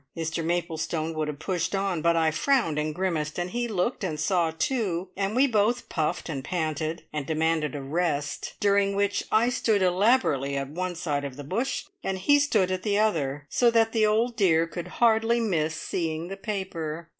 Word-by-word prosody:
Mr 165 0 -2
Maplestone 165 -1 -2
would 155 -1 -2
have 150 -1 -4
pushed 180 +3 -2
on, 195 -4 -1
but 170 +1 +3
I 160 -1 +3
frowned 165 - +1
and 155 0 -2
grimaced, 160 -5 -2
and 175 0 -2
he 240 +1 -1
looked 215 +2 -1
and 160 -5 -2
saw 170 +2 +2
too, 190 - -1
and 195 +2 -1
we 260 +2 +5
both 235 -1 +1
puffed 155 -2 -1
and 140 -5 -4
panted, 160 -1 -2
and 150 -2 -3
demanded 160 -2 0
a 140 - -5
rest, 145 0 -2
during 200 -1 +2
which 200 0 +1
I 230 +3 +4
stood 220 -5 +1
elaborately 180 - +2
at 135 0 -3
one 180 +3 -3
side 145 -4 -2
of 140 -2 -5
the 145 - -8
bush, 230 - -2 0.2
and 190 0 -1
he 290 +10 +4
stood 215 -10 +2
at 185 0 -1
the 205 +1 0
other, 145 -10 0
so 240 +8 +3
that 225 -1 +3
the 220 -2 +3
old 230 +3 +1
dear 170 -7 +3
could 170 +1 -6 0.2
hardly 225 +1 +4
miss 160 -8 0
seeing 165 0 -3
the 195 - -6
paper. 170 -6 -4
175 Hz, 190 wpm, -26 LUFS, 155-210 Hz, 0.2 s, we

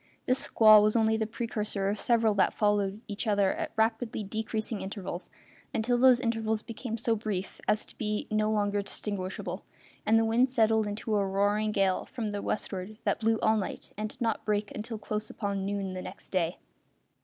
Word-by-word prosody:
This 255 +1 +3
squall 215 -1 +7
was 210 +1 +2
only 220 -1 +3
the 220 -1 -1
precursor 215 -3 -2
of 205 +1 -1
several 230 -3 +3
that 200 - +2
followed 205 -1 +1
each 210 +2 -3
other 200 -2 +3
at - - -4
rapidly 225 0 0
decreasing 220 +1 -3
intervals 190 -3 -6 0.5
until 230 +2 +1
those 255 -1 +6
intervals 220 -2 -1
became 230 0 -5
so 230 0 +1
brief 205 -3 -4
as 210 - +2
to - - -14
be 210 -1 -2
no 215 0 +2
longer 205 -1 +1
distinguishable, 200 -2 -4 0.4
and 225 - +4
the 225 - +3
wind 240 +4 +3
settled 220 -3 +3
into 210 +1 -2
a 200 -1 +2
roaring 205 +2 +1
gale 195 -2 +1
from 225 -4 -4
the 205 0 -3
westward 200 0 -3
that - - +1
blew 225 0 +2
all 220 0 +4
night 200 - -5
and 215 +1 -3
did 250 - -16
not 225 -2 0
break 210 -1 -1
until 220 +1 -5
close 210 0 -4
upon 200 -2 -3
noon 200 -2 -2
next 185 - -8
day. 175 -2 0
215 Hz, 185 wpm, -29 LUFS, 205-225 Hz, 0.5 s, squall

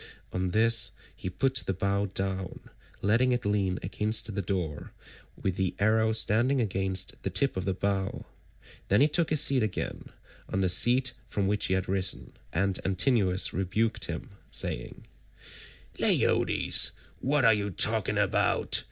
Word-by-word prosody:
On 90 0 -1
this 110 0 +3 0.2
he 90 - -6
put 130 +9 -1
the 95 - -1
bow 100 +2 -1
down, 95 -1 -5 0.3
letting 120 +5 +2
it 120 -2 -2
lean 100 -3 0
against 105 +3 -1
the 100 - -2
door,164 85 -6 -7
with 95 -2 -1
the 95 -1 -1
arrow 110 +2 +2
standing 115 +5 +2
against 95 -3 -2
the - - -3
tip 135 +9 +1
of 95 - -3
the 95 -1 -1
bow. 95 0 -3 0.6
Then 100 +6 +3
he 145 - +6
took 165 +2 0
his 155 -2 +2
seat 135 -2 +3
again 110 -3 -4 0.4
on 95 - -1
the 95 - +1
seat 125 +7 +4
from 100 - -2
which 105 +2 0
he 95 - +1
had 95 - -2
risen; 90 -10 -1 0.2
and 95 +2 0
Antinous 95 -1 +1
rebuked 105 +5 0
him 85 +2 -6 0.2
saying: - - -3 0.9
"Leiodes, - - +3 0.3
what 140 -1 +1
are 115 - +6
you 105 -1 -2
talking 90 - +3
about? - - +2
100 Hz, 150 wpm, -28 LUFS, 95-115 Hz, 0.9 s, he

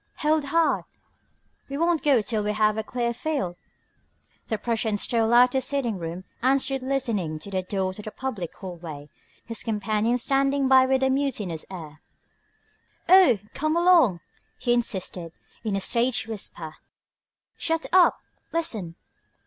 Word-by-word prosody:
"Hold 305 -1 +2
hard! 330 +3 +1 0.8
We 275 - -4
won't 335 0 +1
go 270 -7 +3
till 215 -1 -1
we 210 0 -1
have 215 0 +2
a 220 - -1
clear 235 +1 -2
field." 235 - -2 0.9
The 220 - -1
Prussian 225 -2 -1
stole 225 +1 +1
out 245 +1 +7
into - - +1
the - - -5
sitting 255 -6 -1
room 170 +2 -5 0.2
and 265 +3 +3
stood 270 0 0
listening 235 - -1
at 155 +6 -9
the 190 -1 0
door 185 0 -2
to 210 - -8
the 215 - -7
public 215 -8 -5
hallway, 165 -6 -8 0.4
his 230 -1 -4
companion 215 +2 0
standing 275 +2 +1
by 260 0 +6
with 265 0 +2
a 265 - +3
mutinous 225 - -2
air. 155 -5 -9 1.1
"Oh, 365 - +7 0.2
come 310 +2 0
along!" 335 - +4 0.4
he 240 - +1
insisted, 190 -7 -3 0.3
in 215 -3 -1
a - - 0
stage 245 +4 +1
whisper. 185 -7 -6 0.8
"Shut 325 -1 -1
up! 365 -2 +5 0.3
Listen...." 225 - -1
235 Hz, 150 wpm, -25 LUFS, 195-275 Hz, 1.1 s, out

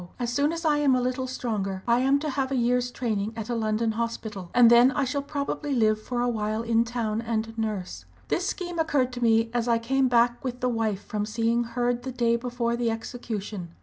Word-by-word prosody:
As 240 -1 -2
soon 285 +4 +2
as 335 0 -5
I 300 -2 +3
am 280 -3 +4
a - - +2
little 255 +1 -1
stronger 205 -7 -3
I 235 +1 +4
am 270 +2 +3
to 305 - -2
have 270 0 -1
a - - +1
year's 245 0 +1
training 220 -4 -2
at 225 0 -6
a - - 0
London 220 0 0
hospital, 220 -5 -4
and 240 -1 +6
then 240 +2 +7
I 275 +1 0
shall 275 +2 -1
probably 285 0 -3
live 215 -2 +2
for 240 +2 -3
a 245 - +1
while 215 -1 -1
in 230 0 +2
town 230 -2 -2
and 225 -1 -3
nurse. 200 - -4 0.2
This 365 +3 0
scheme 350 -4 -4
occurred 280 -6 +1
to 245 -1 -4
me 225 0 +3
as 240 -1 0
I 235 -1 +3
came 260 +3 +1
back 240 0 +2
with 250 -1 -4
the 250 - 0
wife 220 -4 -1
from 210 -1 -3
seeing 230 +2 +1
Hurd 240 +1 -1
the 260 +1 -5
day 235 -2 +1
before 235 0 -2
the 235 -1 0
execution. 215 -6 -5
235 Hz, 225 wpm, -26 LUFS, 225-255 Hz, 0.2 s, then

